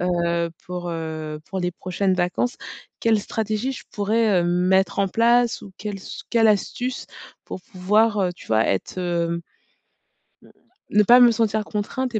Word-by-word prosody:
heu, 170 -1 0 0.2
pour, 180 -1 -5
heu, 155 -2 -5
pour 190 - -3
les 180 0 -1
prochaines 185 +2 -1
vacances. 180 +7 -1 0.4
Quelle 225 -2 +2
stratégie 215 +4 -2
je 265 - -7
pourrais, 210 -2 +2
heu, - - -1
mettre 180 +2 +2
en 200 - +3
place 235 +3 +2
ou 200 - -10
quelle 210 -1 -5
s 190 - -9
quelle 225 -2 +4
astuce? 245 +5 -1 0.4
Pour - - -7
pouvoir, 210 +2 +1
heu, 180 -2 +1
tu - - -15
vois, 110 0 +3
être 95 - -2
heu 175 -2 0
mmh, 170 0 -2 1.5
ne 210 0 +6
pas 245 +5 +7
me 240 -1 +8
sentir 220 -1 0
contrainte 225 +4 -3
et - - +2
195 Hz, 165 wpm, -23 LUFS, 175-225 Hz, 1.5 s, me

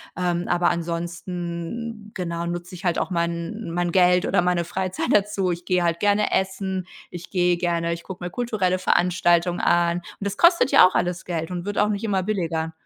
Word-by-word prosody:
Ähm, 175 -1 -1
aber 175 0 +2
ansonsten, 175 +5 -4
genau, 170 -2 -3
nutze 175 +1 -5
ich 185 +2 -10
halt 175 -2 +1
auch - - -2
mein 170 +5 -2
mein 175 0 -1
Geld 180 0 +4
oder - - +2
meine 175 -1 +1
Freizeit 185 +2 -3
dazu. 200 -2 +2
Ich 175 0 -5
gehe 180 -1 +1
halt 170 0 0
gerne 205 0 +2
essen. 190 -1 -1 0.3
Ich 175 0 -9
gehe 180 -1 +2
gerne 170 -1 -1
ich 170 0 -4
gucke 185 -2 -8
mir 175 - -3
kulturelle 195 -4 -1
Veranstaltungen 175 -1 +2
an. 170 0 +2
Und 175 - -7 0.2
das 200 0 -3
kostet 340 -4 +5
ja - - +8
auch - - -5
alles 180 +1 -1
Geld 165 -1 -3
und 175 0 -4
wird 205 0 -4
auch 210 +1 +3
nicht 205 0 -2
immer 195 -3 0
billiger. 165 -5 -2
180 Hz, 195 wpm, -23 LUFS, 170-190 Hz, 0.3 s, ja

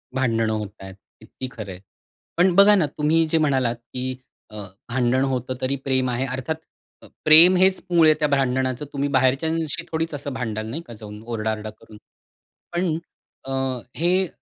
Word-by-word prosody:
भांडणं 115 -4 +1
होतायेत. 100 -3 -7 0.2
किती 130 - -8
खरं 105 -5 -8
आहे. 90 - -9 0.6
पण 180 +1 +4
बघा 200 +2 +7
ना, 185 -6 +3
तुम्ही 155 +2 +3
जे 165 - +2
म्हणालात 130 -6 +1
की 125 +2 -6 0.3
अ, 105 - -13 0.3
भांडण 125 +1 +1
होतं 130 -1 -2
तरी 130 +2 0
प्रेम 130 -1 +1
आहे, 125 +2 -1
अर्थात 130 +5 -3 0.5
अ - - -13 0.2
प्रेम 165 +4 +9
हेच 190 +1 +3
मूळ 170 -2 +5
आहे 155 - +7
त्या 150 - +2
भांडणाचं. 130 -1 0
तुम्ही 140 +1 -1
बाहेरच्यांशी 140 +4 0
थोडीच 160 0 -2
असं 145 -1 -5
भांडाल, 110 -4 -4
नाही 155 +8 -5
का, 120 - -9
जाऊन 105 -1 -10
ओरडा-आरडा 110 -2 -3
करून? 110 0 -15 0.8
पण 175 -2 0 0.5
अ, 135 - -6 0.5
हे 180 +3 +2
130 Hz, 160 wpm, -23 LUFS, 120-160 Hz, 0.8 s, प्रेम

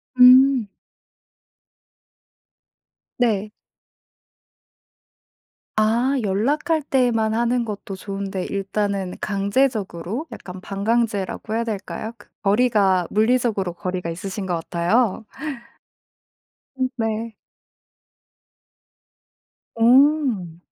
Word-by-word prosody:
음. 255 -1 +7 2.5
네. 215 -4 +1 2.3
아 230 +5 +2
연락할 285 - +1
때만 240 -6 +1
하는 235 +1 +1
것도 205 -2 -6
좋은데 195 -1 -4
일단은 200 -1 -2
강제적으로 205 - -1
약간 185 0 -9
반강제라고 215 0 -1
해야 230 - 0
될까요? 220 0 -5
그 - - -18
거리가 200 -4 +3
물리적으로 215 -5 +1
거리가 180 0 -4
있으신 190 +4 -5
것 180 -2 -1
같아요. 185 +7 0 1.5
음 260 0 +1
네. 225 -1 -2 2.4
어. 240 - +3
215 Hz, 165 characters per minute, -22 LUFS, 195-245 Hz, 2.5 s, 음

